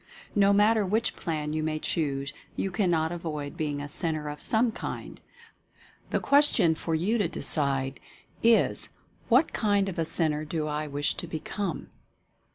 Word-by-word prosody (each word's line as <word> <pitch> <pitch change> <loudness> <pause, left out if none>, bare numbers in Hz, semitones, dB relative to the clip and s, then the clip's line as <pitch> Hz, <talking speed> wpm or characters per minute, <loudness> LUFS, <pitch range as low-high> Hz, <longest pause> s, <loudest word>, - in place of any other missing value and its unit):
No 200 -1 +4
matter 210 +2 +4
which 215 +5 0
plan 150 -2 -3
you 155 - -1
may 155 0 -1
choose, 140 -4 -2 0.2
you 195 - -2
cannot 175 -4 +1
avoid 155 -4 -5
being 145 -2 -2
a - - -5
Centre 155 0 +3
of 150 0 -8
some 230 +1 +2
kind - - -7 0.4
— - - -30
the - - 0
question 280 - +4
for 160 +1 -3
you 205 +9 0
to 200 - +2
decide 135 -4 -1 0.4
is, 230 0 +3 0.4
"What 260 +6 +4
kind 205 -2 +1
of 185 -3 -4
a 165 - +1
Centre 155 -2 +1
do 155 0 -3
I 150 0 -3
wish 145 0 -1
to 175 - -6
become?" 165 +3 -4
160 Hz, 165 wpm, -27 LUFS, 150-200 Hz, 0.4 s, No